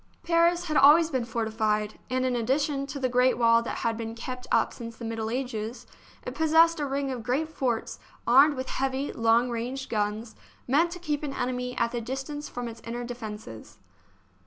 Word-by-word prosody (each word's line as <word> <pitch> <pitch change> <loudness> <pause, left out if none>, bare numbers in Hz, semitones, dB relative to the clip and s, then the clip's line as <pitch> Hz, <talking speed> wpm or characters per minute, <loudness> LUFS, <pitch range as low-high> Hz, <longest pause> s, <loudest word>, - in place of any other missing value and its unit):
Paris 340 +1 +3
had 310 -3 -2
always 315 +4 +7
been 255 -4 -1
forti 230 -1 -2
fied, 215 -1 -1
and 255 0 0
in 255 -1 0
addition 275 +4 0
to 285 - -6
the 260 - +1
great 250 0 +3
wall 230 -1 +5
that 235 - -4
had 230 -1 +1
been 225 0 -5
kept 250 +2 -7
up - - +2
since 230 -2 -8
the 235 - -7
Middle 225 -1 -3
Ages, 240 -1 -4 0.4
it - - -4
possessed 320 +1 +4
a 290 - -1
ring 275 0 -2
of 250 -2 -4
great 260 +7 0
forts 255 -7 -2 0.3
armed 280 +5 +6
with 260 0 -4
heavy, 270 +1 -1
long 230 +2 +3
range 250 +3 -4
guns, 215 +1 -2 0.3
meant 305 +7 +3
to - - -7
keep 305 -5 -2
an 290 -3 -4
enemy 250 0 -3
at 235 0 +1
the 240 - -3
distance 270 +5 -5
from 245 -1 -5
its 230 0 -9
inner 240 +1 -5
defences. 215 - -8
250 Hz, 195 wpm, -27 LUFS, 230-280 Hz, 0.4 s, always